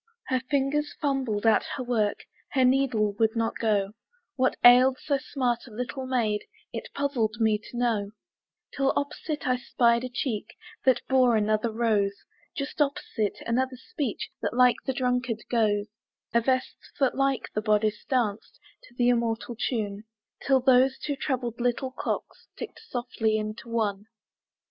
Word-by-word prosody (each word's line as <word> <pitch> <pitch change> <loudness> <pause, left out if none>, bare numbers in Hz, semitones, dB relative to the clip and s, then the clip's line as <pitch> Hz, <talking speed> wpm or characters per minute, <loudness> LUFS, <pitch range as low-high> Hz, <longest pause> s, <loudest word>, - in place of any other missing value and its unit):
Her 260 -1 +2
fingers 290 +1 0
fumbled 260 -7 -1
at 225 - +5
her 260 - -3
work, 220 -4 0 0.3
Her 260 -2 +4
needle 250 -5 +2
would 220 0 +2
not 230 0 0
go; 205 -3 +1 0.4
What 260 -1 +1
ailed 255 +2 +8
so 280 -2 0
smart 250 -3 -2
a - - -13
little 250 +4 -4
maid 225 -5 0 0.3
It - - -5
puzzled 255 -6 0
me 220 -2 +3
to 240 +2 -10
know, 220 -4 0 0.6
Till 275 -1 +2
opposite 295 +1 -3
I 255 0 +2
spied 235 -1 +2
a 255 - -3
cheek 235 -4 -3 0.3
That 255 -2 +4
bore 255 -3 +4
another 215 +1 +1
rose; 215 -3 +1 0.4
Just 280 +1 -3
opposite, 250 -7 -1
another 255 +2 0
speech 275 - -4
That - - -2
like 250 -1 +5
the 265 - +1
drunkard 250 -3 -1
goes; 210 -3 +2 0.5
A 235 - +4
vest 255 +2 0 0.2
that, 270 -3 +3
like 275 -1 0
the 215 - -1
bodice, 215 0 +1
danced 230 -6 -1 0.3
To 240 - -20
the 245 0 +3
immortal 235 0 0
tune, 210 -3 -2 0.4
Till 265 -1 +3
those 260 +1 +4
two 290 - -3
troubled 250 -4 -3
little 245 +2 0
clocks 255 - -4
Ticked - - -8
softly 235 -3 0
into 215 +2 -5
one. 210 -3 -1
245 Hz, 155 wpm, -27 LUFS, 220-260 Hz, 0.6 s, ailed